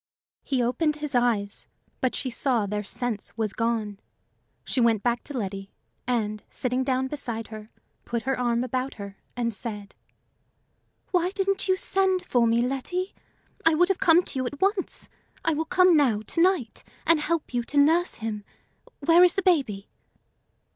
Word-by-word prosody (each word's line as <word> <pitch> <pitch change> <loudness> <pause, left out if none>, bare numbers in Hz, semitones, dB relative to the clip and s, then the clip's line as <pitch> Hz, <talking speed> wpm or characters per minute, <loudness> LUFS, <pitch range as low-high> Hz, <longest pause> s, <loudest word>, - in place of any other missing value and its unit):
He 260 -3 0
opened 295 +6 +1
his 300 -1 -5
eyes, 230 -5 0 0.3
but 255 - 0
she 260 - -2
saw 235 -2 +1
their 210 +1 -3
sense 220 +1 -4
was 215 -3 -1
gone. 225 -4 -1 0.7
She 255 - 0
went 225 -3 +3
back 240 0 0
to 285 - -5
Letty, 195 -2 -4 0.4
and, 215 -4 -1
sitting 255 +1 -1
down 260 0 0
beside 240 -6 -5
her, 215 -1 -9 0.3
put 235 -1 -3
her 270 +1 0
arm 240 -1 +1
about 255 +2 -3
her, 200 -2 -9 0.2
and 235 -1 -1
said: 205 -1 -6 1.2
"Why 360 -1 +2
didn't 390 0 0
you 375 - +4
send 380 -1 +1
for 240 -2 +2
me, 230 +1 +3
Letty? 355 +9 -3 0.5
I 325 -1 +4
would 355 +3 +3
have 390 - +1
come 355 -2 +5
to 270 - -4
you 255 - -1
at 285 +2 -7
once. 390 0 -1 0.4
I 325 - +3
will 315 +2 -1
come 365 +1 +5
now, 240 -8 +3
to 335 - -1
night, 350 -10 +1 0.2
and 335 -2 +4
help 315 -2 -2
you 245 - +1
to 290 - -4
nurse 325 +5 +4
him. 220 -2 -5 0.6
Where 335 +5 +6
is 360 -1 +5
the 390 - 0
baby?" 265 - +1
255 Hz, 170 wpm, -26 LUFS, 225-330 Hz, 1.2 s, Where